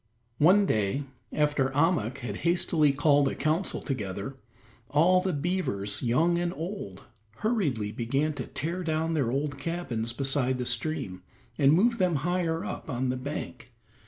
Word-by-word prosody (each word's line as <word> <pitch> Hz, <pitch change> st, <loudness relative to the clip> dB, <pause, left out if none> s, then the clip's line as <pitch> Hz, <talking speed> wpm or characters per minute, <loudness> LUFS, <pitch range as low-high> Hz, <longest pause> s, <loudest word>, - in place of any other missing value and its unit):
One 190 Hz, +7 st, +6 dB
day, 110 Hz, -, 0 dB, 0.3 s
after 150 Hz, -3 st, +1 dB
Ahmuk 145 Hz, -, +2 dB
had 105 Hz, -3 st, -4 dB
hastily 170 Hz, -3 st, +2 dB
called 145 Hz, 0 st, +3 dB
a -, -, -2 dB
council 155 Hz, +6 st, 0 dB
together, 105 Hz, -2 st, -4 dB, 0.5 s
all 175 Hz, +6 st, +4 dB
the 185 Hz, -, -1 dB
beavers, 145 Hz, -, -1 dB
young 160 Hz, +8 st, +2 dB
and 175 Hz, 0 st, -1 dB
old, 160 Hz, -, -6 dB, 0.4 s
hurriedly 145 Hz, -, 0 dB
began 135 Hz, +7 st, -1 dB
to 135 Hz, -4 st, -5 dB
tear 175 Hz, +4 st, -3 dB
down 160 Hz, 0 st, 0 dB
their 140 Hz, -7 st, +1 dB
old 140 Hz, +2 st, -2 dB
cabins 140 Hz, -8 st, -3 dB
beside 135 Hz, 0 st, 0 dB
the 125 Hz, -, -3 dB
stream 120 Hz, -6 st, -1 dB, 0.3 s
and 140 Hz, -2 st, +4 dB
move 230 Hz, +8 st, +3 dB
them 180 Hz, -3 st, +2 dB
higher 175 Hz, -2 st, 0 dB
up -, -, -6 dB
on 125 Hz, 0 st, -1 dB
the 130 Hz, -, 0 dB
bank. 130 Hz, -2 st, -6 dB
145 Hz, 150 wpm, -28 LUFS, 125-170 Hz, 0.5 s, One